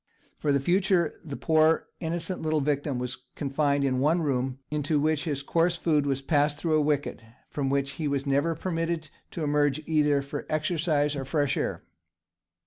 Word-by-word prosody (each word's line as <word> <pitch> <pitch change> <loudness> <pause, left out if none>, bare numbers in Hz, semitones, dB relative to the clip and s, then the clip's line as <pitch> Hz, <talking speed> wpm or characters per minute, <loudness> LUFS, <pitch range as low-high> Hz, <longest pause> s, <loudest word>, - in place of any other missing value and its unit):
For 150 - +1
the 140 - +3
future 175 +2 +1
the 145 -3 -6
poor 160 0 +3
innocent 170 +2 -2
little 155 -1 +1
victim 145 -1 -1
was 125 0 -3 0.2
confined 140 0 0
in 130 -2 +1
one 160 +5 +2
room, 130 -2 -1
into 150 0 0
which 155 0 +1
his 145 -3 -2
coarse 170 +4 +2
food 150 -4 +1
was 135 0 -1
passed 145 0 +2
through 160 0 -1
a 155 - +4
wicket, 145 -1 0
and 115 0 -20 0.2
from 140 -2 -1
which 140 0 0
he 155 +1 -3
was 140 -1 -1
never 145 +4 +1
permitted 165 -2 -2 0.2
to 165 - -5
emerge 145 -1 +2
either 150 -3 +2
for 140 +1 -6
exercise 155 -2 +1
or 135 - -3
fresh 140 0 0
air. 85 - -2
150 Hz, 180 wpm, -27 LUFS, 140-160 Hz, 0.2 s, a